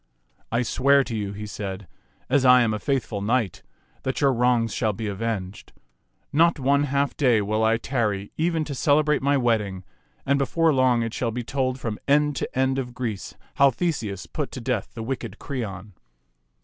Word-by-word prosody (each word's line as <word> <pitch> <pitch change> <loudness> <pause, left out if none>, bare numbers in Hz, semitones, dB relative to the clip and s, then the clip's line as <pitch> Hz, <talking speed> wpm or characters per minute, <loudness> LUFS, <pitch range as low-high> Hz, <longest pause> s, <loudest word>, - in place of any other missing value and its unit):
" - - -40
I 120 +2 +1
swear 140 +3 +3
to 120 -3 -5
you," 100 -2 -3
he 105 +1 -6
said, 100 -2 -6 0.2
" - - -39
as 135 0 +2
I 125 -1 +7
am 110 -2 +1
a 105 - -2
faithful 125 -7 -2
knight, 105 -5 0 0.4
that 130 - -2
your 140 -2 +3
wrongs 120 -2 +2
shall 110 -3 0
be 110 +2 -5
avenged. 100 -2 -4 0.6
Not 170 +3 +4
one 140 +2 +2
half 140 0 0
day 125 -6 +3
will 105 +2 0
I 110 +1 +3
tarry 110 -6 -2
even 165 0 0
to 145 - -5
cele 145 +3 +3
brate 150 -1 +1
my 140 +1 +2
wedding; 105 -7 0 0.4
and 140 +1 +2
before 160 +3 +2
long 130 -3 +3
it 115 -1 -4
shall 120 - -1
be 120 +2 -4
told 130 +1 -1
from 115 -4 -4
end 150 +1 +3
to - - -4
end 130 0 +2
of 125 -2 -5
Greece 115 -6 -4 0.2
how 140 0 +6
Theseus 120 - -2
put 150 -3 -4
to - - -5
death 120 -4 -2
the 115 - -5
wicked 130 +3 -4
Creon. 105 -7 -6
125 Hz, 195 wpm, -24 LUFS, 110-140 Hz, 0.6 s, I